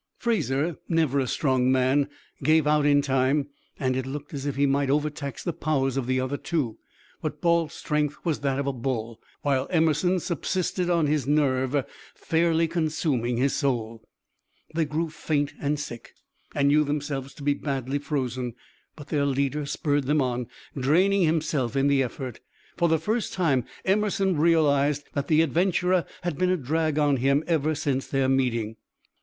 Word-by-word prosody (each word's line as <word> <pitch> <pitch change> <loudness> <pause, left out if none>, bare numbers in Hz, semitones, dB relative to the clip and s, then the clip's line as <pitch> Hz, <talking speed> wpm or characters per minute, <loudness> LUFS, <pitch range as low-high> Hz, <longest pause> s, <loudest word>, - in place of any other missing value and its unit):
Fraser, 165 - 0
never 160 -5 +2
a 130 - 0
strong 130 -1 +1
man, 130 +2 +2 0.3
gave 155 +2 +4
out 150 -1 +3
in 145 -1 +4
time, 135 +1 +1 0.3
and 130 -1 0
it 130 0 -2
looked 145 +2 -6
as 140 0 -4
if 140 - -2
he 140 +1 +2
might 140 0 +1
overtax 145 -2 -2
the 175 - -2
powers 140 -5 0
of 135 -3 -2
the 130 0 +1
other 130 +2 -2
two, 145 -11 -2 0.4
but - - -4
Balt's 170 -2 +1
strength 150 -1 -1
was 165 -4 0
that 140 -1 0
of 140 - -1
a 140 - -1
bull, 115 -3 -3 0.2
while 135 -2 +1
Emerson 165 +2 +2
subsisted 180 +1 -1
on 170 -3 +3
his 150 -2 0
nerve, 140 -2 +1 0.3
fairly 165 0 +1
consuming 155 -7 0
his 135 +3 +2
soul. 115 -5 -1 0.7
They 160 0 +1
grew 155 +2 -2
faint 145 -2 -1
and 145 +1 0
sick, 120 -5 -8 0.4
and 140 0 +3
knew 150 +1 +5
themselves 140 -2 -3
to 145 - -10
be 145 0 +3
badly 140 -1 -2
frozen; 130 -5 -3 0.4
but 145 -1 -11
their 145 -3 +1
leader 140 +2 -1
spurred 145 -2 0
them 150 +3 +2
on, 125 -3 -1 0.3
draining 180 +9 +3
himself 155 -6 0
in 135 0 +2
the 140 -1 +3
effort. 125 -1 -4 0.4
For 170 - +2
the 160 - +4
first 215 +8 -2
time 145 -10 +1 0.2
Emerson 195 -1 +2
realized 150 -3 +3
that 140 -1 -2
the 160 0 +4
adventurer 180 +3 +1 0.2
had 175 -5 -3
been 185 0 +2
a 185 - +2
drag 155 +2 0
on 145 -2 +3
him 140 +4 +2
ever 155 -2 +1
since 135 -2 -1
their 135 -1 +1
meeting. 120 -4 0
145 Hz, 170 wpm, -26 LUFS, 135-160 Hz, 0.7 s, knew